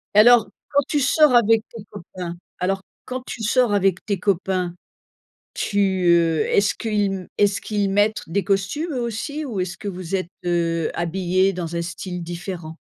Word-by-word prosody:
Alors 225 -1 +7 0.2
quand 285 0 +4
tu 295 - +1
sors 280 -1 +4
avec 225 -1 +5
tes 225 -3 -9
copains 175 0 -7 0.2
alors 190 +1 -1 0.2
quand 255 0 -4
tu 230 - -6
sors 235 0 +3
avec 195 -2 +2
tes 200 -4 -1
copains, 185 -2 0 0.8
tu 205 - -2 0.3
heu 165 -2 +4
est-ce 200 0 +3
qu'ils 200 -4 -1
est-ce 205 -1 +3
qu'ils 205 -2 -1
mettre 205 +2 +2
des 195 +2 0
costumes 200 - -1
eux 250 - -1
aussi 285 +7 -3
ou 220 -9 -3
est-ce 180 +1 -3
que 210 -4 -5
vous 185 -1 -5
êtes 185 -2 -3 0.2
heu, 165 -2 0
habillés 185 +2 +1
dans 170 -2 -4
un 170 - -1
style 180 0 -5
différent? 170 -1 -6
195 Hz, 165 wpm, -22 LUFS, 175-220 Hz, 0.8 s, Alors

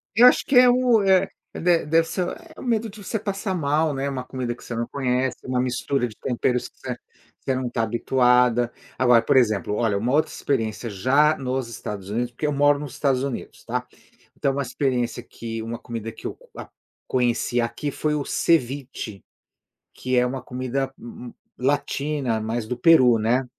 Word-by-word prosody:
Eu 245 +3 +8
acho - - +4
que 275 - 0
é 250 0 +8
o 245 -3 +4
é, 190 -1 +4 0.3
de 170 -2 +2
deve 165 +1 +4
ser 180 +2 -2 0.3
o - - -9
medo 230 -3 0
de 205 0 -12
você 220 - -2
passar 195 -1 -3
mal, 155 0 +1
né? 135 +1 -2
Uma 130 -2 -4
comida 125 -2 -4
que - - -16
você 120 - -6
não 115 0 -2
conhece, 130 -2 -1
uma 130 -1 -1
mistura 125 0 0
de 110 - -12
temperos 125 0 -1
que - - -39
você - - -5 0.5
você 130 - +1
não 130 -1 -2
tá 115 -1 -1
habituada. 125 +1 +3 0.3
Agora, 125 -2 +5
por 115 - +1
exemplo, 110 -4 +2
olha, 110 -4 +1
uma 120 +6 -1
outra 155 - +2
experiência 115 -3 -2
já 140 +10 +3
nos 130 -2 -2
Estados 105 -4 -7
Unidos, 120 +3 -1
porque 150 +5 -3
eu 150 - 0
moro 145 0 +4
nos 145 -3 -7
Estados 135 -3 +1
Unidos, 140 -3 -6
tá. - - -2 0.5
Então, 135 - +1
uma 140 - -1
experiência 125 -2 -1
que 115 -1 -7
uma 115 +1 -5
comida 115 -2 -6
que - - -14
eu - - -6
co - - -22 0.6
conheci 120 -1 +1
aqui 120 +5 -2
foi 150 +2 -1
o 145 - -1
ceviche, 135 -10 -1 0.7
que 130 0 -2
é 125 - +4
uma 130 +1 -3
comida 130 +1 -3
mm 120 +1 -10 0.3
latina, 140 -2 0
mais 110 +1 -3
do 125 +1 -3
Peru, 130 -7 +6
né. 120 +4 +1
130 Hz, 190 wpm, -24 LUFS, 120-145 Hz, 0.7 s, Eu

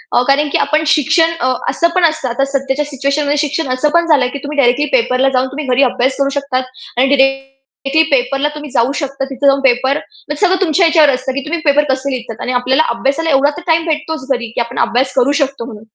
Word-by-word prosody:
हो, 245 - +4
कारण 285 +2 +2
की - - +2
आपण 310 +2 +1
शिक्षण 325 +3 +2
अ, 255 -4 +1 0.2
असं 340 - +1
पण 365 - +2
असतं 310 -5 -1
आता 255 +3 0
सध्याच्या 275 +1 -2
सिच्युएशनमध्ये 285 +1 -1
शिक्षण 290 +1 -3
असं 295 +4 0
पण 340 0 +2
झालंय, 280 -6 +3
की 280 - -6
तुम्ही 295 +1 -6
डायरेक्टली 270 +2 +3
पेपरला 260 - +1
जाऊन 255 +1 +1
तुम्ही 280 +2 -6
घरी 275 - +4
अभ्यास 260 +1 0
करू 275 0 +1
शकतात. 260 -2 -2 0.3
आणि 260 +2 +3
डायरेक्टली 270 +2 -1
पेपरला 275 +2 +1
तुम्ही 300 0 -8
जाऊ 245 0 +1
शकता. 275 -1 -4
तिथे 270 +1 -4
जाऊन 275 0 +4
पेपर, 265 +2 +2
म्हणजे 385 -2 -4
सगळं 375 +1 +1
तुमच्या 350 0 +2
याच्यावर 315 -3 +4
असतं, 260 +1 -3
की 275 - -3
तुम्ही 335 +2 -3
पेपर 290 +1 +4
कसे 270 +1 -3
लिहितात. 235 -2 -6
आणि 250 - -2
आपल्याला 265 +5 +2
अभ्यासाला 280 +6 -1
एवढा 280 0 +3
तर - - -7
टाईम 325 0 +2
भेटतोच 310 -3 -3
घरी, 235 -2 -5
की - - 0
आपण 235 +1 -4
अभ्यास 255 +2 -1
करू 260 +2 +2
शकतो, 275 -4 -2
म्हणून. 215 -3 -10
275 Hz, 220 wpm, -15 LUFS, 260-300 Hz, 0.3 s, हो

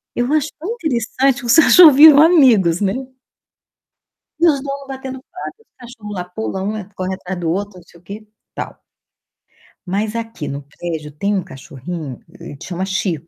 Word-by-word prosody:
Eu 245 +3 -1
acho 310 0 +1
tão 350 +8 -5
interessante 270 - 0
que - - -9
os 235 - +4
cachorros 325 -1 +8
viram 295 0 +9
amigos, 245 - +4
né. 195 -1 +1 1.5
E - - 0
os 280 - -4
dono 275 0 -5
batendo 265 0 -7
papo, 365 - -8
os - - -54
cachorro 235 -4 -11
lá 180 - -3
pula, 195 -3 -4
um 200 - -2 0.3
corre 185 0 -3
atrás 185 0 -7
do 170 -2 -2
outro, 205 -2 -8
não - - -18
sei 170 0 -20
o - - -29
que, 195 +3 -8 0.4
tal. - - -7 1.1
Mas 210 +4 -2
aqui 225 -9 -5
no 140 +1 -5
prédio 150 +1 -7
tem 200 +8 -2
um 190 - -1
cachorrinho, 140 -1 -8 0.2
ele 145 - -10
chama 180 +2 -4
Chico. 180 -5 -3
205 Hz, 175 wpm, -18 LUFS, 175-265 Hz, 1.5 s, viram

